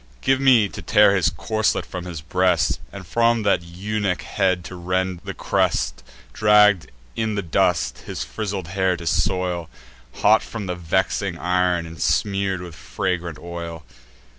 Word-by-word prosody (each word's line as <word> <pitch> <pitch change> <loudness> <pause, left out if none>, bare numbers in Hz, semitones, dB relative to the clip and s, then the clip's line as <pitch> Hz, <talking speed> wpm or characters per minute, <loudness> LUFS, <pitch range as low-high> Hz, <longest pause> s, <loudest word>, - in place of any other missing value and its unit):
Give 135 0 +2
me 125 -6 +5
to - - -9
tear 105 -2 +5
his 95 - +3
corslet 110 +6 -1
from 90 -1 -7
his 85 -5 -6
breast, 90 +2 +1
And 100 -1 -9
from 115 +4 +2
that 100 -3 +2
eunuch 95 +2 -3
head 95 -3 0
to 90 - -8
rend 90 0 -2
the - - -5
crest; - - 0 0.3
Dragg'd 105 -3 +4 0.3
in 110 -2 -1
the 100 - -2
dust, 80 - +1
his - - -5
frizzled 95 - -4
hair 95 -1 +1
to 85 - -9
soil, 90 -1 0 0.5
Hot - - +6
from 110 -3 -6
the 90 - -2
vexing 90 +2 -1
ir'n, 90 -1 +1
and 80 0 -9
smear'd 100 -2 0
with 90 -2 -8
fragrant 85 0 -3
oil!" 85 -1 -7
90 Hz, 155 wpm, -22 LUFS, 85-100 Hz, 0.5 s, Hot